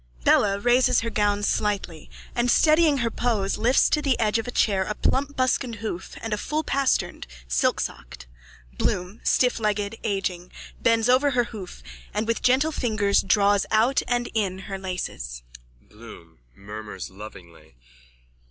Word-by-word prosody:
_(Bella 200 Hz, -1 st, +4 dB
raises 245 Hz, +1 st, +4 dB
her 230 Hz, 0 st, -3 dB
gown 205 Hz, -1 st, +1 dB
slightly 200 Hz, -6 st, -2 dB, 0.2 s
and, 240 Hz, +1 st, 0 dB
steadying 310 Hz, +1 st, +4 dB
her 230 Hz, -, -1 dB
pose, 215 Hz, -6 st, -1 dB
lifts 240 Hz, +4 st, +4 dB
to 300 Hz, -, +1 dB
the 275 Hz, -4 st, 0 dB
edge 220 Hz, 0 st, +2 dB
of 225 Hz, -, -5 dB
a -, -, -3 dB
chair 200 Hz, -5 st, +1 dB
a 210 Hz, +2 st, -4 dB
plump 285 Hz, +1 st, -1 dB
buskined 255 Hz, -2 st, 0 dB
hoof 205 Hz, -4 st, -6 dB
and 225 Hz, -1 st, -3 dB
a 210 Hz, -, -2 dB
full 305 Hz, +6 st, -2 dB
pastern, 275 Hz, -2 st, 0 dB, 0.3 s
silksocked. -, -, -2 dB, 0.5 s
Bloom, 180 Hz, +4 st, -2 dB
stifflegged, 215 Hz, -3 st, 0 dB
aging, 190 Hz, -4 st, -3 dB, 0.3 s
bends 230 Hz, 0 st, +3 dB
over 260 Hz, +3 st, +4 dB
her 245 Hz, -, +4 dB
hoof 185 Hz, -, -9 dB, 0.3 s
and 215 Hz, -, 0 dB
with 230 Hz, 0 st, -1 dB
gentle 265 Hz, +5 st, +3 dB
fingers 215 Hz, -8 st, +1 dB
draws 200 Hz, +1 st, +2 dB
out 230 Hz, +5 st, +3 dB
and 240 Hz, -1 st, 0 dB
in 195 Hz, -4 st, -1 dB
her 195 Hz, -1 st, -5 dB
laces.)_ 60 Hz, -, -5 dB, 0.4 s
BLOOM: 105 Hz, -, -14 dB, 0.2 s
_(Murmurs 105 Hz, -2 st, -8 dB
lovingly.) 90 Hz, -, -13 dB
210 Hz, 145 wpm, -24 LUFS, 185-245 Hz, 0.5 s, Bella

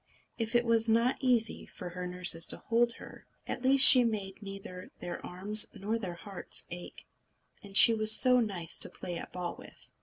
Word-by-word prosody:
If 225 Hz, +1 st, -5 dB
it 240 Hz, 0 st, +1 dB
was 230 Hz, -1 st, +1 dB
not 230 Hz, +3 st, 0 dB
easy 240 Hz, -4 st, -2 dB
for 180 Hz, -, -11 dB
her 180 Hz, +1 st, -8 dB
nurses 180 Hz, -2 st, 0 dB
to -, -, +1 dB
hold 235 Hz, +1 st, -1 dB
her, -, -, -15 dB, 0.2 s
at -, -, -7 dB
least 265 Hz, +1 st, +4 dB
she 250 Hz, -2 st, +8 dB
made 205 Hz, -4 st, -6 dB
neither 195 Hz, -2 st, -11 dB
their 175 Hz, -, -9 dB
arms 205 Hz, +4 st, +3 dB
nor 215 Hz, +4 st, -5 dB
their 185 Hz, -5 st, -8 dB
hearts 195 Hz, +2 st, -6 dB
ache. 175 Hz, 0 st, -11 dB, 0.6 s
And 200 Hz, 0 st, -7 dB
she 230 Hz, -, +6 dB
was 215 Hz, -1 st, +4 dB
so 250 Hz, +2 st, +5 dB
nice 190 Hz, -8 st, -3 dB
to -, -, +6 dB
play 175 Hz, -1 st, -9 dB
at -, -, -12 dB
ball 180 Hz, -1 st, -7 dB
with! -, -, -17 dB
210 Hz, 190 wpm, -28 LUFS, 180-230 Hz, 0.6 s, she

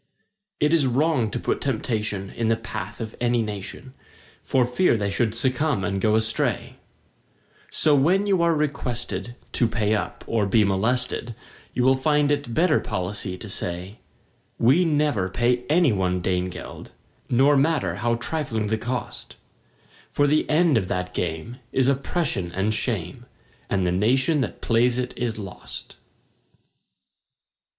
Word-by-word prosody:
It 150 Hz, +2 st, +2 dB
is 150 Hz, -5 st, +4 dB
wrong 130 Hz, -2 st, +1 dB
to 120 Hz, -, -3 dB
put -, -, -1 dB
temptation 110 Hz, -6 st, -2 dB
in 115 Hz, -, -2 dB
the 115 Hz, -, +3 dB
path 105 Hz, -3 st, -6 dB
of 110 Hz, -2 st, -6 dB
any 120 Hz, -1 st, +2 dB
nation, 105 Hz, +5 st, -7 dB, 0.5 s
For 130 Hz, -2 st, +2 dB
fear 125 Hz, +2 st, +2 dB
they 100 Hz, -1 st, -1 dB
should 110 Hz, +1 st, 0 dB
succumb 130 Hz, -1 st, 0 dB
and 100 Hz, -1 st, -1 dB
go 110 Hz, +1 st, +3 dB
astray; 110 Hz, 0 st, 0 dB, 0.9 s
So 155 Hz, -, +3 dB
when 180 Hz, +9 st, +3 dB
you 195 Hz, -4 st, +2 dB
are 170 Hz, -1 st, +3 dB
requested 125 Hz, -5 st, -3 dB, 0.2 s
to 120 Hz, -, +2 dB
pay 110 Hz, -2 st, 0 dB
up 110 Hz, -, -3 dB
or 110 Hz, -3 st, 0 dB
be 105 Hz, +2 st, +4 dB
molested, 115 Hz, +4 st, 0 dB, 0.4 s
You 125 Hz, -, +1 dB
will 130 Hz, +1 st, +5 dB
find 150 Hz, +2 st, +2 dB
it 145 Hz, -4 st, -1 dB
better 180 Hz, +2 st, +3 dB
policy 95 Hz, 0 st, -3 dB
to 105 Hz, -, -9 dB
say: 90 Hz, +2 st, -4 dB, 0.6 s
"We 140 Hz, +10 st, +4 dB
never 145 Hz, -, +1 dB
pay 120 Hz, +4 st, +1 dB
any 160 Hz, -5 st, +4 dB
one 90 Hz, -2 st, 0 dB
Dane 90 Hz, 0 st, -1 dB
geld, -, -, -9 dB, 0.4 s
Nor 135 Hz, +4 st, +4 dB
matter 135 Hz, -, +1 dB
how 115 Hz, +2 st, +1 dB
trifling 120 Hz, -5 st, -2 dB
the 110 Hz, 0 st, 0 dB
cost; 120 Hz, +1 st, -5 dB, 0.8 s
For 145 Hz, -, +2 dB
the 150 Hz, +2 st, +2 dB
end 155 Hz, -5 st, +4 dB
of 95 Hz, -, -4 dB
that 90 Hz, 0 st, -3 dB
game 85 Hz, +8 st, -3 dB
is 130 Hz, -1 st, +2 dB
oppression 140 Hz, -, 0 dB
and 100 Hz, +3 st, 0 dB
shame, 110 Hz, 0 st, -2 dB, 0.4 s
And 95 Hz, -2 st, +1 dB
the 90 Hz, -, +1 dB
nation 130 Hz, -, +2 dB
that 115 Hz, -, -4 dB
plays 120 Hz, +2 st, +2 dB
it 125 Hz, 0 st, -2 dB
is 120 Hz, -3 st, -2 dB
lost!" 95 Hz, -3 st, -8 dB
120 Hz, 150 wpm, -24 LUFS, 105-140 Hz, 0.9 s, will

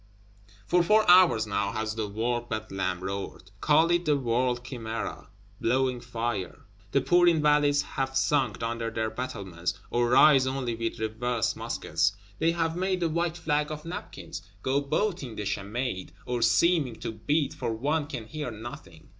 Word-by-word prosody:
For 175 Hz, +8 st, +3 dB
four 215 Hz, +5 st, +4 dB
hours 175 Hz, -11 st, +6 dB
now 100 Hz, 0 st, -1 dB
has 110 Hz, 0 st, -2 dB
the 110 Hz, -1 st, -3 dB
World 120 Hz, +3 st, -2 dB
Bedlam 95 Hz, -4 st, -3 dB
roared; 100 Hz, 0 st, -5 dB
call 160 Hz, +3 st, +4 dB
it 175 Hz, 0 st, +2 dB
the 150 Hz, -2 st, +3 dB
World 125 Hz, -1 st, 0 dB
Chimæra, 115 Hz, -3 st, -5 dB, 0.3 s
blowing 130 Hz, +1 st, +1 dB
fire! 115 Hz, -5 st, -4 dB, 0.3 s
The 140 Hz, -, +3 dB
poor 175 Hz, +4 st, +4 dB
Invalides 150 Hz, -3 st, +4 dB
have 135 Hz, -1 st, -2 dB
sunk 135 Hz, -8 st, +1 dB
under 115 Hz, 0 st, -2 dB
their 110 Hz, 0 st, -2 dB
battlements, 95 Hz, -9 st, -4 dB, 0.2 s
or 120 Hz, 0 st, +2 dB
rise 135 Hz, +1 st, +6 dB
only 130 Hz, -3 st, -2 dB
with 115 Hz, 0 st, -3 dB
reversed 110 Hz, 0 st, -1 dB
muskets; -, -, 0 dB, 0.3 s
they 165 Hz, -, +3 dB
have 165 Hz, -1 st, -1 dB
made 185 Hz, 0 st, 0 dB
a 165 Hz, -, +2 dB
white 170 Hz, +1 st, -1 dB
flag 150 Hz, -2 st, 0 dB
of 150 Hz, 0 st, -6 dB
napkins; 165 Hz, -, -7 dB, 0.2 s
go 135 Hz, +2 st, +1 dB
beating 150 Hz, -, -1 dB
the 105 Hz, -, -4 dB
chamade, 100 Hz, -1 st, -3 dB
or 120 Hz, -1 st, -2 dB
seeming 135 Hz, +1 st, +3 dB
to -, -, -5 dB
beat, 145 Hz, +7 st, 0 dB
for 115 Hz, -, -3 dB
one 145 Hz, +7 st, -1 dB
can 125 Hz, -7 st, -6 dB
hear 150 Hz, +3 st, -5 dB
nothing. 110 Hz, -, -10 dB
125 Hz, 160 wpm, -28 LUFS, 110-150 Hz, 0.3 s, hours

